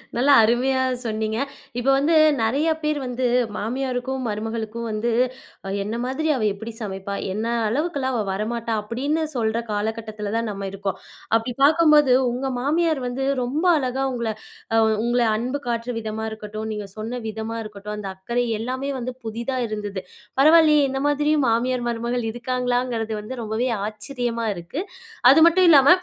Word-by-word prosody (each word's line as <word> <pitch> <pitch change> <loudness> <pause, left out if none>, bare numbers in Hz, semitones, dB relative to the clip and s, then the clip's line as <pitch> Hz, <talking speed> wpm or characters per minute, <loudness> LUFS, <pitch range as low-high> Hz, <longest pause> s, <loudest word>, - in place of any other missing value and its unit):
நல்லா 260 +4 +3
அருமையா 250 +4 +2 0.2
சொன்னீங்க. 220 -1 -2 0.4
இப்போ 265 +3 +2
வந்து 300 +4 +2 0.3
நிறையா 275 +9 +2
பேர் 300 -1 0
வந்து, 250 0 -2 0.3
மாமியாருக்கும், 255 +3 -2
மருமகளுக்கும் 225 +2 -4
வந்து, 220 +2 -1 0.7
"என்ன 210 +3 -4
மாதிரி 265 +5 -2
அவ 255 - -2
எப்படி 220 +3 -7
சமைப்பா? 195 -1 -4 0.2
என்ன 215 +3 -2 0.2
அளவுக்கெல்லாம் 270 +1 -1
அவ 220 - 0
வரமாட்டா?" 230 +3 -2
அப்டின்னு 270 +9 -1
சொல்ற 225 -1 0
காலகட்டத்தில 215 0 -3
தான் 230 -1 -1
நம்ம 195 -1 -5
இருக்கோம். 195 -1 -3 0.4
அப்டி 230 +2 -4
பார்க்கும்போது, 300 -3 +6 0.2
உங்க 260 +3 -2
மாமியார் 310 +2 +1
வந்து 255 +2 -2 0.2
ரொம்ப 285 +8 -1
அழகா 265 -1 -1
உங்கள 235 -3 -2 0.4
அ - - +6 0.2
உங்கள 240 +1 +2
அன்பு 250 +6 -2
காட்டுற 235 +1 -2
விதமா 220 0 -4
இருக்கட்டும், 215 0 -6
நீங்க 210 -1 -5
சொன்ன 230 +3 -4
விதமா 220 +1 -4
இருக்கட்டும், 210 0 -7
அந்த 205 -2 -5
அக்கறை 235 +6 -1
எல்லாமே 260 +4 -3
வந்து 250 +1 -4
புதிதா 235 +4 -3
இருந்தது. 205 -3 -4 0.4
பரவால்லையே! 305 0 +6
இந்த 270 0 -2
மாதிரியும் 295 0 +2
மாமியார், 245 +2 0
மருமகள் 235 +1 -2
இருக்காங்களாங்கிறது 245 -2 -1
வந்து 245 +4 -7
ரொம்பவே 220 +4 -1 0.2
ஆச்சரியமா 235 0 -3
இருக்கு. 175 - -5 0.5
அது 285 - +6
மட்டும் 360 +2 +5
இல்லாம, 280 -2 +7
240 Hz, 145 wpm, -23 LUFS, 220-265 Hz, 0.7 s, இல்லாம